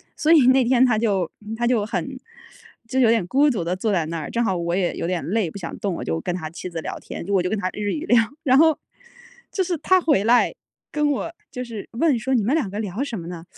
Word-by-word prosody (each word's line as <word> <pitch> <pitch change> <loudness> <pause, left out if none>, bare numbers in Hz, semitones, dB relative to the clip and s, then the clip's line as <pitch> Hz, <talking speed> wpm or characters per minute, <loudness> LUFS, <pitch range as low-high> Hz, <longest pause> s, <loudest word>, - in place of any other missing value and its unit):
所 310 - +1
以 300 -6 +6
那 260 0 +5
天 250 +1 +4
她 240 -4 +2
就 195 -7 0 0.3
她 240 - 0
就 235 -4 +2
很 260 +4 -4 0.7
就 260 +2 -1
有 240 - +5
点 225 -5 +2
孤 285 +8 +4
独 210 -9 -1
地 175 +2 -1
坐 210 +4 -1
在 175 -5 +1
那 165 +1 -4
儿， 155 - -6
正 235 - 0
好 195 -5 0
我 170 0 -1
也 185 -2 0
有 - - -3
点 180 -1 -2
累， 195 -2 0
不 200 - -9
想 175 -4 -6
动， 195 -4 -2
我 - - -5
就 80 0 -2
跟 175 - -2
他 160 -3 -5
妻 180 +2 -7
子 170 -2 -5
聊 - - -6
天， - - -8
我 195 -2 +3
就 180 - -1
跟 220 - -1
她 185 -1 -1
日 205 -1 -2
语 310 +1 -4
聊， 240 - +4 0.3
然 260 -2 +4
后 320 0 +5 0.7
就 380 - 0
是 355 -1 -2
他 375 +4 +4
回 295 - +2
来 240 +2 +4 0.4
跟 300 -1 +1
我 310 +4 -3 0.2
就 250 -3 -5
是 230 -4 -8
问 275 +2 +2
说： 265 +4 -1
“你 230 - +2
们 235 +7 +1
两 290 -11 0
个 205 +2 -5
聊 210 +3 -3
什 245 -6 -4
么 165 - -8
呢？” 170 -1 -8
220 Hz, 285 characters per minute, -22 LUFS, 180-265 Hz, 0.7 s, 以